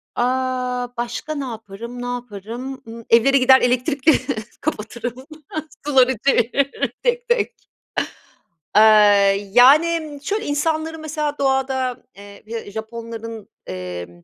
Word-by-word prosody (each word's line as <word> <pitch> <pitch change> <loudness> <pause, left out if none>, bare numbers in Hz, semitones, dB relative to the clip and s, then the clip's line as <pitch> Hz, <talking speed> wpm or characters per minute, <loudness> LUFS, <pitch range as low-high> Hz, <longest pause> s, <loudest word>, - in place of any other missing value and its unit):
Aaa, 250 0 -1
başka 240 +6 -4
ne 280 -2 -3
yaparım? 230 +1 -8
Ne - - -4
yaparım? 245 +2 -6
Imm, 230 +1 -9
evlere 255 +4 +5
gider, 260 0 +6
elektrikleri 260 +4 +3 0.4
kapatırım, 245 -1 -4 0.6
suları 260 -3 +4
çeviririm, 275 +2 +1
tek 485 0 0
tek. 480 -2 +1 1.2
Eee, 205 -2 +5
yani, 300 +4 +5
şöyle, 420 +7 -2
insanları, 315 +2 -1
mesela, 300 -1 -3
doğada, 265 -2 0
eee, 200 0 -13
Ja 225 -3 -6
Japonların, 225 0 -7 0.2
emm, 90 -1 -7
250 Hz, 105 wpm, -21 LUFS, 225-280 Hz, 1.2 s, gider